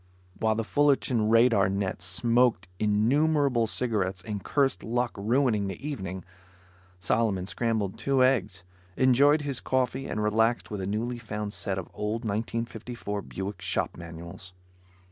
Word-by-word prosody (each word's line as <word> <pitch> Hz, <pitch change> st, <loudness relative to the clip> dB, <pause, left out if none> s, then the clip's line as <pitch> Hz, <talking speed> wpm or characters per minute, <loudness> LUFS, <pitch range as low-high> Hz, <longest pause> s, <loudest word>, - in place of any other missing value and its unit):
While 110 Hz, 0 st, +2 dB
the 115 Hz, -, -1 dB
Fullerton 130 Hz, -4 st, +2 dB
radar 115 Hz, -4 st, +5 dB
net 95 Hz, -2 st, -2 dB
smoked 115 Hz, +2 st, +2 dB
innumerable 125 Hz, +4 st, +2 dB
cigarettes 100 Hz, -6 st, -1 dB
and 100 Hz, 0 st, -5 dB
cursed 140 Hz, -2 st, +1 dB
luck 120 Hz, +2 st, 0 dB
ruining 110 Hz, 0 st, +1 dB
the 95 Hz, -, -4 dB
evening, 95 Hz, -, -5 dB, 0.7 s
Solomon 100 Hz, 0 st, 0 dB
scrambled 110 Hz, -2 st, -1 dB
two 135 Hz, -2 st, +2 dB
eggs, 110 Hz, -9 st, +1 dB, 0.3 s
enjoyed 140 Hz, +4 st, +5 dB
his 140 Hz, -3 st, -2 dB
coffee 130 Hz, +1 st, -1 dB
and 105 Hz, -, -2 dB
relaxed 110 Hz, +3 st, +1 dB
with 105 Hz, -2 st, -3 dB
a 95 Hz, -, -3 dB
newly 120 Hz, +4 st, -2 dB
found 105 Hz, -2 st, -5 dB
set 95 Hz, -3 st, -3 dB
of 95 Hz, -, -5 dB
old 110 Hz, +3 st, -3 dB
1954 110 Hz, 0 st, -3 dB
Buick 95 Hz, +1 st, -6 dB
shop -, -, -1 dB
manuals. 85 Hz, +2 st, -8 dB
110 Hz, 135 wpm, -27 LUFS, 100-125 Hz, 0.7 s, radar